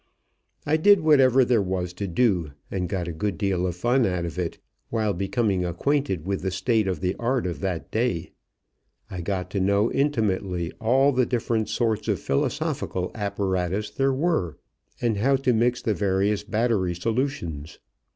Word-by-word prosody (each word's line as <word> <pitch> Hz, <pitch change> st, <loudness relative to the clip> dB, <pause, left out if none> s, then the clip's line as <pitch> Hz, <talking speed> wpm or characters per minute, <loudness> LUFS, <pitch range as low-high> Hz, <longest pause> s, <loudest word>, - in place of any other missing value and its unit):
I 155 Hz, +2 st, +2 dB
did 200 Hz, +5 st, +5 dB
whatever 135 Hz, -4 st, +5 dB
there 120 Hz, -3 st, +3 dB
was 90 Hz, -2 st, -2 dB
to 100 Hz, +2 st, -4 dB
do 90 Hz, -, +1 dB, 0.2 s
and 90 Hz, -3 st, -2 dB
got 90 Hz, -2 st, -2 dB
a -, -, -3 dB
good 90 Hz, +2 st, -2 dB
deal 95 Hz, -1 st, 0 dB
of 90 Hz, -, -3 dB
fun 120 Hz, +7 st, +2 dB
out 90 Hz, -2 st, -1 dB
of 85 Hz, +2 st, -5 dB
it, 85 Hz, -2 st, -3 dB, 0.3 s
while 110 Hz, -3 st, 0 dB
becoming 95 Hz, 0 st, 0 dB
acquainted 95 Hz, -, -1 dB
with 95 Hz, 0 st, -2 dB
the 95 Hz, -, -1 dB
state 100 Hz, +3 st, +1 dB
of 90 Hz, -5 st, -2 dB
the 90 Hz, +1 st, 0 dB
art 125 Hz, 0 st, 0 dB
of 90 Hz, -2 st, -3 dB
that 90 Hz, -4 st, -3 dB
day. 110 Hz, -8 st, -1 dB, 0.8 s
I 90 Hz, -2 st, -4 dB
got 90 Hz, 0 st, -3 dB
to 100 Hz, -, -1 dB
know 100 Hz, +4 st, +2 dB
intimately 100 Hz, -, 0 dB
all 135 Hz, +5 st, +4 dB
the 125 Hz, -2 st, +1 dB
different 115 Hz, -2 st, -1 dB
sorts 110 Hz, -3 st, 0 dB
of -, -, +1 dB
philosophical 90 Hz, +5 st, -1 dB
apparatus 100 Hz, -1 st, -2 dB
there 135 Hz, +5 st, +1 dB
were, 135 Hz, -, 0 dB, 0.4 s
and 115 Hz, -3 st, 0 dB
how 135 Hz, +7 st, +3 dB
to 130 Hz, -2 st, +1 dB
mix 120 Hz, +2 st, +1 dB
the 110 Hz, -, +1 dB
various 100 Hz, +1 st, 0 dB
battery 110 Hz, -6 st, 0 dB
solutions. 90 Hz, -, -3 dB
100 Hz, 170 wpm, -25 LUFS, 90-120 Hz, 0.8 s, did